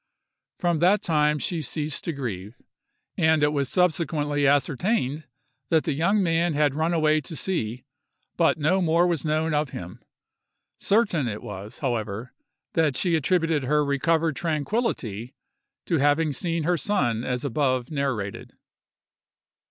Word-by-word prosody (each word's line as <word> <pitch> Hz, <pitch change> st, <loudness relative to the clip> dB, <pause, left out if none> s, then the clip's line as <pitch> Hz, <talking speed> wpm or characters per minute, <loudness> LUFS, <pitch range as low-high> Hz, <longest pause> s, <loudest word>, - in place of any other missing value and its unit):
From 175 Hz, -3 st, 0 dB
that 185 Hz, +5 st, +3 dB
time 150 Hz, -2 st, +2 dB
she 165 Hz, +3 st, -2 dB
ceased 150 Hz, +1 st, -3 dB
to 170 Hz, -, -1 dB
grieve, 115 Hz, -, -6 dB, 0.6 s
and 160 Hz, -1 st, +3 dB
it 145 Hz, 0 st, +3 dB
was 140 Hz, -2 st, 0 dB
subsequently 150 Hz, -4 st, +1 dB
ascertained 145 Hz, -, 0 dB, 0.4 s
that 160 Hz, -1 st, +3 dB
the 155 Hz, -, -1 dB
young 195 Hz, +8 st, +2 dB
man 165 Hz, -1 st, +1 dB
had 145 Hz, -2 st, +2 dB
run 160 Hz, +3 st, 0 dB
away 155 Hz, -2 st, +2 dB
to 155 Hz, +4 st, -6 dB
sea; 125 Hz, -, -2 dB, 0.5 s
but 165 Hz, -2 st, +3 dB
no 160 Hz, +6 st, +2 dB
more 170 Hz, 0 st, +3 dB
was 170 Hz, -3 st, -1 dB
known 155 Hz, +1 st, 0 dB
of 150 Hz, -1 st, 0 dB
him. 90 Hz, -5 st, -8 dB, 0.8 s
Certain 200 Hz, -, +2 dB
it 105 Hz, -2 st, -5 dB
was, 105 Hz, +3 st, -8 dB
however, 110 Hz, -1 st, -3 dB, 0.4 s
that 155 Hz, -5 st, +2 dB
she 175 Hz, -3 st, +1 dB
attributed 165 Hz, -2 st, +1 dB
her 150 Hz, +2 st, +2 dB
recovered 155 Hz, +2 st, +1 dB
tranquillity 145 Hz, -, -2 dB, 0.5 s
to 165 Hz, -, +1 dB
having 145 Hz, +2 st, +2 dB
seen 165 Hz, +4 st, -2 dB
her 175 Hz, +2 st, +1 dB
son 120 Hz, -, 0 dB
as 125 Hz, +2 st, -2 dB
above 130 Hz, -1 st, 0 dB
narrated. 130 Hz, -9 st, -3 dB
150 Hz, 140 wpm, -25 LUFS, 130-165 Hz, 0.8 s, that